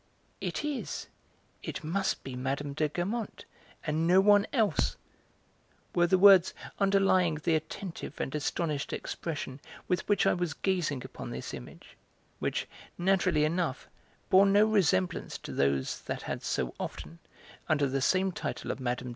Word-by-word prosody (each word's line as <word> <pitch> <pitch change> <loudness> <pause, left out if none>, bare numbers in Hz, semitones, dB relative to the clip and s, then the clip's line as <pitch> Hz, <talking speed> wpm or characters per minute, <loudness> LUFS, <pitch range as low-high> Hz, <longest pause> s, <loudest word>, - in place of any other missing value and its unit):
"It - - -3
is, 295 -3 -3 0.6
it - - -6
must 190 +5 -1
be 135 -2 -6
Mme. 135 +3 -2
de 155 +1 0
Guermantes, 200 +8 -3 0.4
and 160 +1 0
no 180 +2 +6
one 205 +1 +5
else!" 225 -6 +1 1.0
were 175 -1 +3
the 185 +2 +4
words 190 -2 +7 0.2
underlying 195 -4 +3
the 160 +2 0
attentive 165 +3 -5
and 135 - -3
astonished 150 -1 -2
expression 145 -5 -5 0.3
with 180 +2 -1
which 205 - +3
I - - +4
was 175 -4 -2
gazing 170 -9 -1
upon - - -8
this 65 +1 -6
image, - - -10 0.4
which, - - -2 0.3
naturally 185 -3 +2
enough, 160 -3 -1 0.4
bore 195 +1 +7
no 205 +2 +5
resemblance 180 - +1
to - - -9
those 70 -1 0
that - - -5
had - - -4
so 60 -1 -2
often, 80 +3 -6 0.5
under 145 -2 +3
the 135 0 -1
same 190 +6 +2
title - - -4
of - - -5
'Mme. 125 -1 0
170 Hz, 145 wpm, -30 LUFS, 140-195 Hz, 1.0 s, words